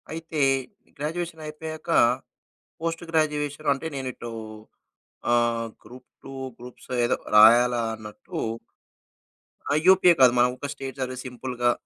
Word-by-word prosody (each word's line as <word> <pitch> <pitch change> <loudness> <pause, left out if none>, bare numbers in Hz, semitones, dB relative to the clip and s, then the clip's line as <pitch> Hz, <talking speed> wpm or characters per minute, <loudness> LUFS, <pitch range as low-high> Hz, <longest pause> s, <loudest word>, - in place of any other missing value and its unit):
అయితే 160 -1 -5 0.6
గ్రాడ్యుయేషన్ 160 +2 -4
అయిపోయాక 155 +2 -8 0.9
post 165 0 -3
graduation 150 -2 0
అంటే, 140 +3 -8
నేను 135 -1 -4
ఇటు 120 0 -8 1.0
ఆహ్, 120 -1 +1 0.2
గ్రూప్-2, 130 +2 -14 0.2
గ్రూప్స్ 125 +1 -13 0.2
ఏదో 120 - +1 0.2
రాయాలా 120 +3 +7
అన్నట్టు 105 -1 -10 1.3
ఆ! - - +2
యూపీఏ 185 -2 +7
కాదు. 125 -2 +8
మనం 125 +1 +5
ఒక 145 - -5
స్టేట్ 135 -1 -8
సర్వీస్ 130 -1 -4
సింపుల్‌గా. 125 -1 -1
135 Hz, 110 wpm, -25 LUFS, 120-155 Hz, 1.3 s, కాదు